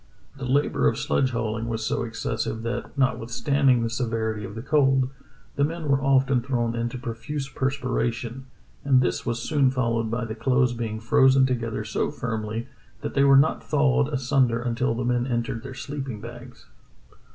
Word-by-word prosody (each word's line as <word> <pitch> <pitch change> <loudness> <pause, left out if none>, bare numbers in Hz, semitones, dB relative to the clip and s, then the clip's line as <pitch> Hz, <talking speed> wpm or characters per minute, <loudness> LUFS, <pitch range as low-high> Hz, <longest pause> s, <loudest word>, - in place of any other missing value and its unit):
The 135 -2 -6
labor 140 +3 +2
of - - +1
sledge 130 - +1
hauling 115 -1 -2
was 110 -1 -2
so - - 0
excessive 115 -1 -3
that, 120 +3 -4
notwithstanding 130 0 +2
the 115 - -1
severity 115 -3 -2
of 100 - -7
the 115 - -6
cold, 135 -2 +3 0.5
the 140 - +3
men 160 +1 -2
were 135 -1 +3
often 135 -2 +3
thrown 120 -2 -1
into 120 +1 -2
profuse 125 +4 -5
perspira 130 -2 -1
tion, 120 +3 -7 0.4
and 135 -2 +4
this 125 - -1
was 120 0 -1
soon 145 -4 +3
followed 115 -3 0
by 115 +1 -2
the 110 - -5
clothes 125 +1 +2
being 115 -2 -4
frozen 130 +4 +5
together 115 -4 -2
so 110 - -1
firmly 110 0 -4 0.3
that - - -4
they 140 - +3
were 140 -1 +7
not 155 +4 +3
thawed 145 -2 +2
asunder 130 -3 +2
until 120 0 -1
the 120 +1 -2
men 120 0 +1
entered 120 -2 -2
their 135 -1 -8
sleeping 135 -4 -5
bags." 120 +2 -11
125 Hz, 175 wpm, -25 LUFS, 115-135 Hz, 0.5 s, were